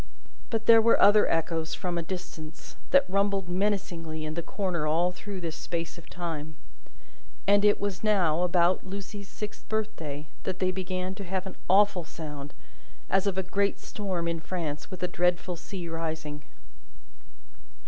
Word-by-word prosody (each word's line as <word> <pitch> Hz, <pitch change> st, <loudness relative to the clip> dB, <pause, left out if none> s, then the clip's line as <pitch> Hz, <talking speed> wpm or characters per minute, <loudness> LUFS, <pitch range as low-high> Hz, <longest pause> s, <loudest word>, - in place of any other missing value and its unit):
But, 225 Hz, -2 st, -1 dB
there 225 Hz, -1 st, +9 dB
were 230 Hz, +1 st, +5 dB
other 210 Hz, +1 st, +7 dB
echoes, 165 Hz, -1 st, 0 dB
from 180 Hz, -1 st, -2 dB
a 170 Hz, -, 0 dB
distance, 165 Hz, -2 st, -7 dB
that 275 Hz, 0 st, +5 dB
rumbled 195 Hz, 0 st, +1 dB
menacingly 175 Hz, -4 st, -1 dB
in 155 Hz, -, -3 dB
the 170 Hz, -, -2 dB
corner 175 Hz, -3 st, -1 dB
all 170 Hz, +4 st, +3 dB
through 195 Hz, +1 st, -7 dB
this 165 Hz, -2 st, -3 dB
space 170 Hz, -1 st, -4 dB
of 170 Hz, -, -15 dB
time. 160 Hz, -3 st, -4 dB, 0.9 s
And 205 Hz, +1 st, +5 dB
it 210 Hz, 0 st, +5 dB
was 200 Hz, -1 st, -2 dB
now, 180 Hz, -7 st, +3 dB
about 180 Hz, 0 st, +4 dB
little 190 Hz, -, -10 dB
Lucie's 200 Hz, 0 st, -7 dB
sixth 210 Hz, -1 st, -7 dB
birthday, 165 Hz, -10 st, -2 dB, 0.2 s
that 185 Hz, -1 st, -3 dB
they 185 Hz, 0 st, +2 dB
began 185 Hz, 0 st, -3 dB
to 200 Hz, +1 st, -7 dB
have 190 Hz, +1 st, -2 dB
an 190 Hz, -, -7 dB
awful 195 Hz, -2 st, +5 dB
sound, 150 Hz, -3 st, -8 dB, 0.6 s
as 195 Hz, +1 st, +3 dB
of 190 Hz, -2 st, 0 dB
a 190 Hz, -, +1 dB
great 200 Hz, +2 st, +1 dB
storm 185 Hz, -5 st, -3 dB
in 170 Hz, -1 st, -1 dB
France 160 Hz, -4 st, -4 dB
with 185 Hz, -1 st, -6 dB
a -, -, +2 dB
dreadful 180 Hz, 0 st, +1 dB
sea 175 Hz, +1 st, -6 dB
rising. 160 Hz, -2 st, -4 dB
180 Hz, 165 wpm, -28 LUFS, 165-200 Hz, 0.9 s, there